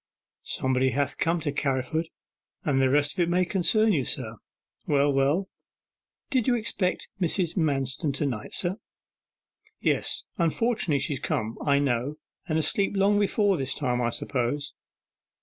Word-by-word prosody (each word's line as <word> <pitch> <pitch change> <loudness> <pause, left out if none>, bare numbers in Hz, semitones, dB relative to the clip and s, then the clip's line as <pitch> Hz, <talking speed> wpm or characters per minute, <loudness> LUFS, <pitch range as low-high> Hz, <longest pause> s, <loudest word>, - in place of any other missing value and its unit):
'Somebody 130 0 0
ha' 140 0 0
come 165 +1 +1
to 150 -2 -1
Carriford: 140 +3 -1 0.6
and 135 -3 +2
the 130 - +3
rest 145 +1 +2
of - - -9
it 175 -1 +2
may 180 +1 +2
concern 210 +4 +2
you, 140 -6 +1
sir.' - - -3 0.5
'Well, 145 0 +3
well.' 140 +8 +2 0.9
'Did 255 -5 +1
you 250 - +4
expect 215 -5 -2
Mrs. 175 0 +1
Manston 140 -3 +1
to 145 - 0
night, 120 -7 -3
sir?' 185 +2 +2 1.0
'Yes, - - 0 0.2
unfortunately 175 -1 +1
she's 140 -1 -2
come, 110 -1 -2
I 140 -1 +3
know, 140 0 0 0.3
and 155 -2 0
asleep 195 +6 +1
long 200 +1 +3
before 205 -1 +2
this 135 -1 -2
time, 125 -4 0
I 120 - +1
suppose. 130 +4 -2
150 Hz, 150 wpm, -26 LUFS, 135-185 Hz, 1.0 s, you